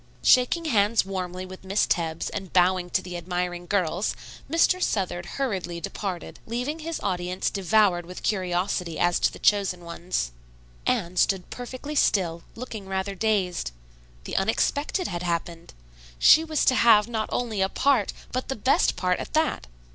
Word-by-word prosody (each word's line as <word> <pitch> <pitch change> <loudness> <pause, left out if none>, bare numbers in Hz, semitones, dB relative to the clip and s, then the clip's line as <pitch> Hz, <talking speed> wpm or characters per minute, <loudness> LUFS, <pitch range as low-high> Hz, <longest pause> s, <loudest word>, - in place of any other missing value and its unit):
Shaking 255 +7 +4
hands 215 -6 +3
warmly 185 -1 -4
with 185 0 -11
Miss 195 +2 +1
Tebbs 165 -2 -1
and 190 -3 -6
bowing 180 0 +3
to - - 0
the 180 -1 -7
admiring 175 0 -3
girls, 185 0 0 0.3
Mr. 350 +3 +3
Southard 180 - -1
hurriedly 190 -10 -2
departed, 185 +1 -5
leaving 250 +7 -3
his 330 0 -4
audience 180 -1 -1
devoured 195 -3 +2
with 180 - -9
curiosity 180 -3 -1
as 175 0 +2
to - - +2
the - - -10
chosen 195 -3 +2
ones. 170 - -3 0.6
Anne 175 +2 0
stood 190 0 +1
perfectly 255 +4 -6
still, 175 - +2
looking 225 -5 -7
rather 190 +1 -2
dazed. 195 - 0 0.5
The - - -4
unexpected 285 - 0
had 175 -2 -4
happened. 170 -1 -3 0.5
She 315 - +7
was 315 -2 0
to - - +5
have 225 -4 +5
not 220 -2 -2
only 225 -5 -1
a 190 - +2
part, 255 -5 +2 0.2
but 255 +1 -2
the 270 - -2
best 255 +5 +2
part, 180 -1 0
at - - -7
that. 310 - +1
190 Hz, 155 wpm, -25 LUFS, 180-230 Hz, 0.6 s, She